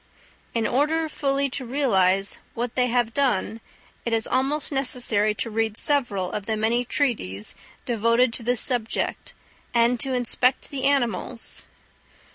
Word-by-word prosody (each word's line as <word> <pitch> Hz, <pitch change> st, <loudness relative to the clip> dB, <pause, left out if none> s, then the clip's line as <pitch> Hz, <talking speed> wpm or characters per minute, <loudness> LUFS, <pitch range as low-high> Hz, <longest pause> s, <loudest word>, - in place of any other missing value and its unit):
In 230 Hz, -1 st, +1 dB
order 305 Hz, +5 st, +1 dB
fully 280 Hz, -2 st, 0 dB
to 260 Hz, -, -3 dB
realise 195 Hz, -8 st, +2 dB, 0.2 s
what 240 Hz, +1 st, -3 dB
they 250 Hz, -1 st, +2 dB
have 240 Hz, -2 st, 0 dB
done 230 Hz, -5 st, 0 dB, 0.4 s
it 235 Hz, -, -2 dB
is 225 Hz, -1 st, +1 dB
almost 280 Hz, +4 st, -1 dB
necessary 240 Hz, -6 st, +1 dB
to 230 Hz, -, -4 dB
read 220 Hz, 0 st, 0 dB
several 240 Hz, -, +1 dB
of 205 Hz, -1 st, -5 dB
the 220 Hz, -1 st, -1 dB
many 230 Hz, +3 st, +1 dB
treatises 215 Hz, -, 0 dB, 0.3 s
devoted 230 Hz, +1 st, +2 dB
to -, -, +2 dB
this 245 Hz, +1 st, 0 dB
subject, 240 Hz, -3 st, 0 dB, 0.4 s
and 235 Hz, +1 st, +3 dB
to 270 Hz, 0 st, +1 dB
inspect 250 Hz, +1 st, 0 dB
the 270 Hz, -2 st, -3 dB
animals. 245 Hz, -4 st, -1 dB
240 Hz, 140 wpm, -24 LUFS, 220-270 Hz, 0.4 s, and